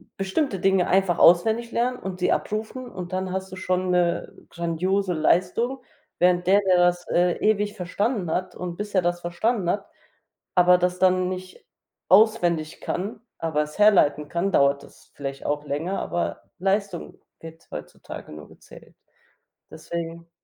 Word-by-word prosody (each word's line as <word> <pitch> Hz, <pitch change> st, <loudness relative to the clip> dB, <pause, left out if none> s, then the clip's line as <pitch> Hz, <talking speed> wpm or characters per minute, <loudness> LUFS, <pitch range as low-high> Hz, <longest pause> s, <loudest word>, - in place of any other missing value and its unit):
bestimmte 195 Hz, +3 st, -1 dB
Dinge 190 Hz, -2 st, +3 dB
einfach 190 Hz, -2 st, +2 dB
auswendig 220 Hz, +7 st, +4 dB
lernen 250 Hz, +2 st, 0 dB
und 185 Hz, -1 st, -6 dB
sie -, -, +2 dB
abrufen 220 Hz, +4 st, -3 dB
und 180 Hz, -4 st, -7 dB
dann 185 Hz, 0 st, -2 dB
hast 190 Hz, 0 st, -4 dB
du 185 Hz, -, -8 dB
schon 185 Hz, 0 st, -1 dB
'ne 175 Hz, -1 st, +1 dB, 0.2 s
grandiose 180 Hz, +3 st, -1 dB
Leistung, 185 Hz, +11 st, +1 dB, 0.4 s
während 180 Hz, 0 st, +3 dB
der, 200 Hz, +2 st, +5 dB
der 190 Hz, -2 st, +3 dB
das, 175 Hz, 0 st, +2 dB
äh, 175 Hz, 0 st, +3 dB
ewig 210 Hz, -1 st, +1 dB
verstanden 200 Hz, 0 st, -2 dB
hat 185 Hz, +3 st, -2 dB
und 175 Hz, -1 st, -6 dB
bis 210 Hz, 0 st, -5 dB
er 185 Hz, -, +5 dB
das 175 Hz, 0 st, -1 dB
verstanden 175 Hz, +3 st, -1 dB
hat 200 Hz, +2 st, -1 dB, 0.7 s
aber 180 Hz, 0 st, +6 dB
das 180 Hz, 0 st, -1 dB
dann 185 Hz, 0 st, +3 dB
nicht 185 Hz, 0 st, -8 dB, 0.4 s
auswendig 180 Hz, -6 st, +3 dB
kann, 205 Hz, +4 st, -4 dB, 0.2 s
aber 160 Hz, -2 st, 0 dB
es 150 Hz, +5 st, -11 dB
herleiten 150 Hz, -9 st, +4 dB
kann, 175 Hz, +3 st, -1 dB
dauert 140 Hz, -3 st, +3 dB
es -, -, -18 dB
vielleicht 135 Hz, -1 st, -6 dB
auch 145 Hz, 0 st, -1 dB
länger, 160 Hz, +7 st, -2 dB
aber 175 Hz, -, -3 dB, 0.2 s
Leistung 195 Hz, -1 st, -2 dB, 0.2 s
wird 165 Hz, 0 st, -12 dB
heutzutage -, -, -9 dB
nur 75 Hz, -1 st, -11 dB
gezählt. -, -, -16 dB, 0.8 s
Deswegen 170 Hz, 0 st, -6 dB
180 Hz, 155 wpm, -24 LUFS, 170-200 Hz, 0.8 s, aber